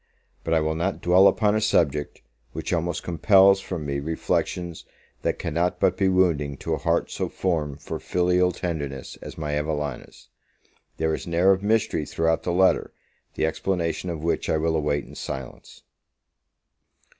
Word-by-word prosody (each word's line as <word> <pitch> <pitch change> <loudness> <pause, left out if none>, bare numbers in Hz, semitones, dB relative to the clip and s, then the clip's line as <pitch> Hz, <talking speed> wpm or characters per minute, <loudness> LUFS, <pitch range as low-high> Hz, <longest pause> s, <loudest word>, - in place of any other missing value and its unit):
But 80 - +1
I 80 - +3
will 80 0 0
not 85 +4 -2
dwell 90 +3 +5
upon 105 0 +3
a 110 - +1
subject, 75 -9 0 0.3
which - - -3
almost 85 -1 -1
compels 95 +2 +5
from 85 -6 -5
me 70 -1 -2
reflections 80 +2 -2 0.4
that - - -1
cannot 90 +2 -1
but 90 - +3
be 95 0 +2
wounding 80 -7 +1
to - - -3
a - - -1
heart - - 0
so - - -3
formed 75 -6 -2
for - - -5
filial 90 0 +2
tenderness 75 -7 -5
as - - -9
my 75 -2 -2
Evelina's. 75 -3 -4 0.7
There 80 0 0
is - - -5
an 85 - -3
air 90 +3 +5
of 95 0 +2
mystery 105 -7 +1
throughout 80 0 0
the 90 - -2
letter, 95 +2 +3 0.4
the - - +1
explanation 85 +1 -2
of 80 -2 -5
which 85 - -1
I - - +2
will 80 +1 0
await 75 -2 0
in - - -14
silence. 65 -2 -8
85 Hz, 165 wpm, -24 LUFS, 75-90 Hz, 0.7 s, dwell